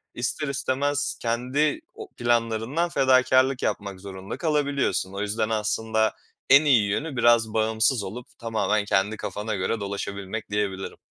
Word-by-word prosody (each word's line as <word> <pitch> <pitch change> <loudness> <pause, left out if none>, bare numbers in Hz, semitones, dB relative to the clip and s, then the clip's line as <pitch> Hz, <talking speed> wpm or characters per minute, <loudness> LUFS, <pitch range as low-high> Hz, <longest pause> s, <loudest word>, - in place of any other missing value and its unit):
ister 130 +5 -2
istemez 140 +1 -1
kendi 130 - 0
o 425 -3 -10
planlarından 120 +7 0
fedakârlık 130 -1 +3
yapmak 100 -2 -2
zorunda 95 +1 -7
kalabiliyorsun. 140 - 0
O 100 - -4
yüzden 105 +1 -1
aslında 110 0 0 0.3
en 140 +3 +7
iyi 115 -8 +4
yönü 145 +7 -2
biraz 115 -2 +4
bağımsız 110 +1 +2
olup 120 +6 -7
tamamen 110 -2 0
kendi 100 +2 +1
kafana 105 +1 -4
göre 100 +4 -1
dolaşabilmek 100 +1 -5
diyebilirim. 100 -2 -2
115 Hz, 130 wpm, -25 LUFS, 105-130 Hz, 0.3 s, en